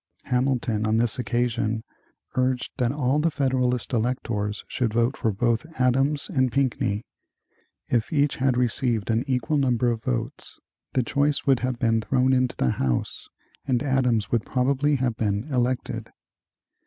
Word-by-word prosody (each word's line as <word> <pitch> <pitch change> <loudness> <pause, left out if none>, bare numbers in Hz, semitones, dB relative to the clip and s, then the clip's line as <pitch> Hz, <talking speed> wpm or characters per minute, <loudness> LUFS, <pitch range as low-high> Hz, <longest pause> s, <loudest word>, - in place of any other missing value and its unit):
Hamilton 125 -4 0
on 110 +1 +2
this 115 0 +1
occasion 120 -2 -1 0.5
urged 130 -1 0
that 125 -3 +1
all 140 0 +1
the 165 +2 +2
Federalist 130 -4 0
electors 110 -3 -1
should 115 -4 -1
vote 120 +2 +2
for 110 - 0
both 115 +6 0
Adams 135 +3 +2
and 130 -3 +1
Pinckney. 120 -5 0 0.8
If 115 -2 0
each 145 -2 +2
had 130 -2 +1
received 120 -3 +1
an 115 +2 +1
equal 130 +3 0
number 125 -3 +2
of 115 -1 -3
votes, - - -4 0.3
the 130 - +2
choice 140 +3 +1
would 135 -3 +4
have 125 -1 -2
been 115 -2 +2
thrown 130 +4 +2
into 130 -1 +1
the 65 - +1
House 65 -2 -2 0.4
and 125 -1 +1
Adams 125 -6 +1
would 115 -2 +1
probably 140 +3 +1
have 125 -3 0
been 105 -1 0
elected. 125 0 -1
125 Hz, 150 wpm, -25 LUFS, 115-130 Hz, 0.8 s, would